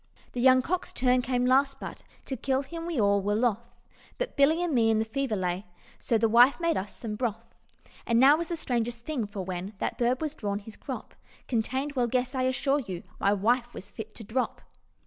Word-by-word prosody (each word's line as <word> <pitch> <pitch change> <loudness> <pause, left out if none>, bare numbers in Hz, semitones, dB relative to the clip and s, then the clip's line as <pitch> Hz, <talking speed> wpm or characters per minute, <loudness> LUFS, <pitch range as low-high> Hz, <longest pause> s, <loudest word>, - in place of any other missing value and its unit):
"The 245 - -3
young 255 0 +6
cock's 365 +4 -2
turn 250 0 +2
came 250 0 0
last, 270 +2 +3
but - - -7 0.2
To 265 - -3
kill 265 +2 0
him 330 +4 -7
we 330 -7 -1
all 200 -1 +3
were 205 +1 0
loth; 235 0 0 0.5
But - - -3
Billy 310 +5 +4
and 345 -3 -1
me 230 -3 +4
in 220 - +3
the 220 - +1
fever 265 0 -2
lay, 185 0 -2 0.3
So 230 - +1
the 225 +1 +3
wife 240 +7 +6
made 335 -1 +1
us 195 +1 -4
some 225 -3 -5
broth. 225 -2 -4 0.5
And 230 -1 +3
now 275 +3 +8
was 335 +1 -3
the 345 - -2
strangest 240 -4 -2
thing, 265 -9 -2
for 200 -1 -6
when 185 +2 -5
That - - -3
bird 245 +1 +2
was 310 -2 -3
drawn, 205 -8 -3
his 210 +1 -10
crop - - -7 0.3
Contained 260 +4 -1
well, 250 -4 +1
guess? 250 +2 0
I 260 - -1
assure 270 +2 +1
you, 190 -9 -6 0.2
My 200 - +3
wife 240 +5 +1
was - - -8
fit 220 -1 -8
to 225 - -8
drop. 245 +5 -2
245 Hz, 220 wpm, -28 LUFS, 220-270 Hz, 0.5 s, now